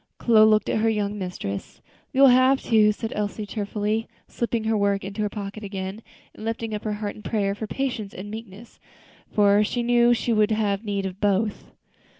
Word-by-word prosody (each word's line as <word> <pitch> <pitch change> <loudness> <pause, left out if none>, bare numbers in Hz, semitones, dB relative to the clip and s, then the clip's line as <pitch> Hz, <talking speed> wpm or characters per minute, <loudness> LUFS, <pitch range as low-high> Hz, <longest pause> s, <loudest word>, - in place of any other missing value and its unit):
Chloe 220 -2 +5
looked 215 -1 +3
at - - 0
her 225 +1 +2
young 210 -1 -1
mistress. 140 - -5 0.3
"You 265 - +1
will 275 - +9
have 255 +2 +5
to," 215 -2 +4
said 220 +1 -5
Elsie, 210 0 -3
tearfully, 210 +1 -2 0.2
slipping 235 -1 -2
her 220 0 +1
work 200 -1 +1
into 200 +2 -5
her 210 - 0
pocket 205 0 -7
again, 195 +1 -5 0.3
and - - -11
lifting 225 0 -3
up 210 - -5
her 215 - -1
heart 205 -1 -4
in - - -12
prayer 205 -3 -1
for 215 +2 -6
patience 240 -5 -3
and 205 +3 -8
meekness, 220 0 -10 0.5
for 205 0 +4
she 240 +3 -1
well - - -3
knew 240 0 +4
she 235 0 -1
would 215 0 +3
have 210 -2 0
need 200 -2 -2
of 190 +1 -6
both. 205 +1 0
210 Hz, 200 wpm, -24 LUFS, 200-225 Hz, 0.5 s, will